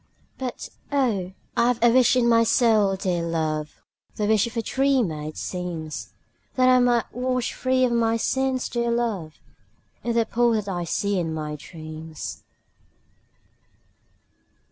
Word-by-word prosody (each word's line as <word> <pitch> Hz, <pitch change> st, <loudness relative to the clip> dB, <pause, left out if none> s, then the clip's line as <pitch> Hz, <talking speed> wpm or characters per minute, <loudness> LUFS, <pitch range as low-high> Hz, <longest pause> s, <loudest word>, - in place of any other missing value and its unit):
But, 255 Hz, -2 st, -5 dB, 0.2 s
oh, 225 Hz, -10 st, 0 dB, 0.2 s
I 240 Hz, +1 st, +4 dB
've 230 Hz, -, -14 dB
a 240 Hz, -, +6 dB
wish 255 Hz, +1 st, +5 dB
in 245 Hz, -2 st, +3 dB
my 230 Hz, -1 st, +5 dB
soul, 220 Hz, -4 st, +3 dB
dear 180 Hz, -2 st, -1 dB
love, 155 Hz, -2 st, -3 dB, 0.3 s
(The 210 Hz, -, -1 dB
wish 215 Hz, +1 st, +3 dB
of 235 Hz, +1 st, -8 dB
a 230 Hz, -, 0 dB
dreamer, 260 Hz, -, +1 dB
it 155 Hz, +1 st, -7 dB
seems,) 170 Hz, -4 st, -5 dB, 0.4 s
That 255 Hz, -1 st, +4 dB
I 255 Hz, 0 st, +6 dB
might 240 Hz, -2 st, +2 dB
wash 250 Hz, 0 st, -1 dB
free 255 Hz, 0 st, +2 dB
of 245 Hz, -, 0 dB
my 230 Hz, -1 st, +2 dB
sins, 265 Hz, +2 st, 0 dB
dear 235 Hz, -1 st, -1 dB
love, 220 Hz, -10 st, -1 dB, 0.7 s
In 235 Hz, -1 st, -1 dB
the 230 Hz, -1 st, +3 dB
pool 240 Hz, +1 st, +2 dB
that 210 Hz, -2 st, -1 dB
I 175 Hz, -3 st, -2 dB
see 200 Hz, +3 st, 0 dB
in 165 Hz, -2 st, -2 dB
my 155 Hz, -1 st, -4 dB
dreams. 155 Hz, +1 st, -8 dB
225 Hz, 150 wpm, -24 LUFS, 170-245 Hz, 0.7 s, a